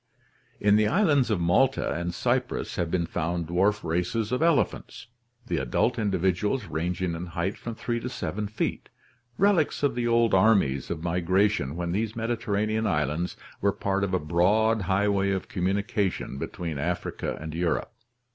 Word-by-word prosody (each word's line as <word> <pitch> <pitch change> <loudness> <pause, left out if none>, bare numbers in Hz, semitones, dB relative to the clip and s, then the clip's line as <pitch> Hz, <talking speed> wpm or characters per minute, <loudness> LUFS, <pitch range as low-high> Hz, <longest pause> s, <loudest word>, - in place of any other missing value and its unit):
In 105 0 +4
the 105 0 +3
islands 150 - +3
of 105 -4 +1
Malta 105 +11 +2
and 85 +1 -2
Cyprus 125 +6 -1
have 85 -3 -1
been 85 -1 0
found 85 +1 -2
dwarf 95 +6 +1
races 90 +7 -1
of 125 - 0
elephants, 165 -7 0 0.4
the - - -1
adult 120 0 0
individuals 100 +4 0
ranging 85 +2 -2
in 85 +2 -5
height 85 +3 -2
from 115 -1 -7
3 120 +1 -2
to 125 - -4
7 105 -4 -3
feet, 105 +2 -3 0.5
relics 185 -7 +2
of 145 - +3
the 120 -1 -1
old 115 -1 +3
armies 95 - +3
of 80 -1 -4
migration 90 -3 +1
when 85 0 -2
these 105 +4 -1
Mediter 115 -1 -3
ranean 110 +2 +1
islands 75 0 -1 0.2
were 100 - +3
part 100 0 -1
of 95 -1 0
a - - +1
broad 105 +8 +2
highway 100 +1 +1
of 95 -1 -2
communication 95 -4 -1
between 80 -2 -4
Africa 85 +4 -3
and 80 0 -6
Europe. 85 +1 -1
100 Hz, 160 wpm, -26 LUFS, 85-110 Hz, 0.5 s, In